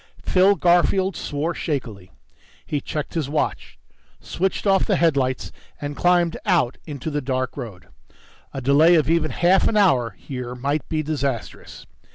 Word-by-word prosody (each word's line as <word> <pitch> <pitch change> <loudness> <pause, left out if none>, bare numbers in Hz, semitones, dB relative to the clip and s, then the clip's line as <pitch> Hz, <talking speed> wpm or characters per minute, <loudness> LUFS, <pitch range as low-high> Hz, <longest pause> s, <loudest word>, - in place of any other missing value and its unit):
Phil 190 +2 +4
Garfield 180 +1 +2
swore 150 +4 -3
shakily. 115 - -4 0.6
He 145 -2 -2
checked 150 +1 -5
his 155 -5 -2
watch, 150 - -3 0.4
switched 190 +3 -2
off 195 -1 +3
the 200 - +1
headlights 140 -7 0 0.3
and 145 0 -5
climbed 175 -1 +2
out 170 - +1
into 145 0 -5
the 145 0 -2
dark 130 -1 -2
road. 110 -9 -8 0.7
A 135 - -6
delay 145 +6 +5
of 155 -1 +2
even 165 -2 +2
half 175 +8 +3
an 215 - 0
hour 130 - +3
here 125 -2 -7
might 140 +4 -2
be 155 -1 -1
disastrous. 140 -6 -4
150 Hz, 150 wpm, -22 LUFS, 130-175 Hz, 0.7 s, delay